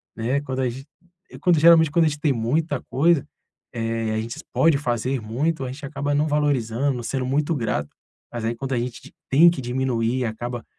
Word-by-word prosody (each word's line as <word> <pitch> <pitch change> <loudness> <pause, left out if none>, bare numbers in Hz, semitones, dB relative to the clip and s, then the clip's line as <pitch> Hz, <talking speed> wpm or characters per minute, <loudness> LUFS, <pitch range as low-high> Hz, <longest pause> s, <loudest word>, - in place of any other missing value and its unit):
né, 125 +5 -1
Quando 130 -2 -4
a 125 - +1
gen 130 +3 -8 0.6
quando 175 -4 +4
geralmente 160 -1 +6
quando 165 +2 +3
a 155 - +3
gente 150 - -6
tem 150 -2 +2
muita 140 +5 -1
coisa, 155 +2 +3 0.5
eh, 115 -1 -2
a 110 - 0
gente 115 +7 -6
pode 160 -3 +4
fazer 125 -1 -1
muito, 135 +8 -1
a 125 - -4
gente 140 +1 -8
acaba 145 +1 -2
não 150 +2 +2
valorizando, 140 -3 0
não 120 - -6
sendo 130 +2 -2
muito 150 +5 0
grato, 105 - -2 0.4
mas 120 -2 -5
aí 115 +1 -1
quando 135 +2 -4
a 120 - +1
gente 120 0 -6 0.2
tem 165 +6 +7
que 170 -6 -3
diminuir 125 -1 -1
acaba 120 +2 -5
130 Hz, 200 wpm, -23 LUFS, 120-150 Hz, 0.6 s, tem